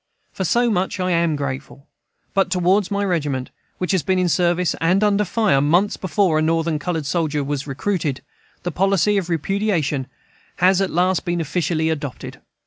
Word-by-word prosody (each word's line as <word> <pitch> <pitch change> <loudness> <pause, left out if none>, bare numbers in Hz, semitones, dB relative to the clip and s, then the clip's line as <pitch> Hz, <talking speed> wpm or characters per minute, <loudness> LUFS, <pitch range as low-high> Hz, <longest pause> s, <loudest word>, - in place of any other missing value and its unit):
For 190 - -3
so 240 +6 +2
much 190 -1 -1
I 185 0 0
am 170 -2 +2
grateful. 140 0 -5 0.5
But 195 -1 +2
toward 185 +2 +2
my 200 0 -1
regiment, 145 -8 -2 0.3
which 180 - -2
had 185 -5 +1
been 185 +5 +1
in 180 -1 +2
service 175 0 +1
and 180 +5 +3
under 210 0 +3
fire, 205 -7 +2
months 175 +8 +2
before 180 -2 +1
a - - +1
Northern 165 0 0
colored 160 -1 -3
soldier 150 -1 -1
was 140 0 -3
recruited, 145 -1 -2 0.4
the 175 - -2
policy 195 +3 +2
of 185 -3 -2
repudiation 165 -6 -1 0.5
has 185 +1 +3
at 195 - 0
last 180 +2 +1
been 175 0 -1
officially 160 0 0
adopted. 145 -4 -6
175 Hz, 170 wpm, -21 LUFS, 155-190 Hz, 0.5 s, and